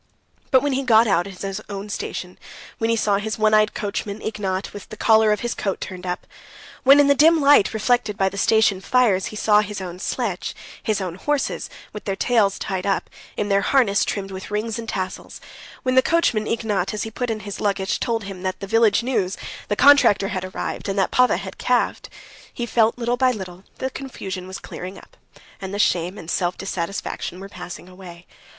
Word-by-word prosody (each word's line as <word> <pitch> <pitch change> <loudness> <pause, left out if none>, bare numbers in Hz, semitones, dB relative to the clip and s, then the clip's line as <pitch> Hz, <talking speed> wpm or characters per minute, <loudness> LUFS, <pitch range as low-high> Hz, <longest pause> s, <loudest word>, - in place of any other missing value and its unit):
But 260 0 +4
when 290 -1 +1
he 265 - 0
got 230 -3 +5
out 195 -4 +2
at 190 -1 -9
his 195 +1 -4
own 200 0 -5
station, 180 -2 -5 0.4
when 225 - 0
he 230 - +3
saw 205 -3 +2
his 215 +1 -3
one 215 0 +3
eyed 215 0 +4
coachman, 205 0 -3
Ignat, 195 -3 -3
with 205 - -10
the 215 - -9
collar 220 -1 +4
of 210 - 0
his 240 0 -2
coat 195 -2 -2
turned 185 -2 -7
up; 180 0 -3 0.6
when, 275 +2 +7
in 290 - +6
the 280 - +5
dim 320 +3 +5
light 285 -6 +5
reflected 220 -1 +1
by 195 - +2
the 190 - -3
station 220 -2 +3
fires, 215 -6 +2
he - - -8
saw 210 0 +4
his 210 -1 -5
own 180 -1 -7
sledge, 205 -3 -3 0.3
his 215 -2 -1
own 180 -3 -3
horses 285 +10 -2 0.2
with 210 - -8
their 195 - -1
tails 215 -3 +2
tied 190 -1 -3
up, 195 - -1 0.3
in 205 - -1
their 200 0 +3
harness 230 -7 +3
trimmed 195 -1 -3
with 190 0 -7
rings 215 +2 -2
and 225 -1 -6
tassels; 185 -1 -5 0.4
when 255 - +1
the 260 - +6
coachman 255 -10 +1
Ignat, 215 -4 -1
as 210 - -2
he 225 - -6
put 245 +2 -3
in 220 -1 -2
his 205 -1 -7
luggage, 195 -2 0
told 230 -2 -1
him 195 -2 -8
the 185 0 -2
village 225 +1 +3
news, 200 -7 0
that - - -11 0.2
the 205 - +1
contractor 250 -7 +5
had 185 -2 -3
arrived, 185 +2 -4
and 195 - -2
that 195 - +1
Pava 250 0 +4
had - - -8
calved,—he 240 - -3
felt 230 -1 +2
that - - -18
little 240 +1 0
by 255 +1 +4
little 190 -4 -8
the 260 - -3
confusion 190 -10 -6
was 190 -1 -6
clearing 185 +2 -8
up, - - -16 0.5
and 190 -1 -5
the 200 - -3
shame 180 -1 +1
and 165 - -6
self 175 0 0
dissatisfaction 185 -1 -4
were 195 - -8
passing 180 -1 -9
away. 180 -2 -12
205 Hz, 210 wpm, -22 LUFS, 190-230 Hz, 0.6 s, when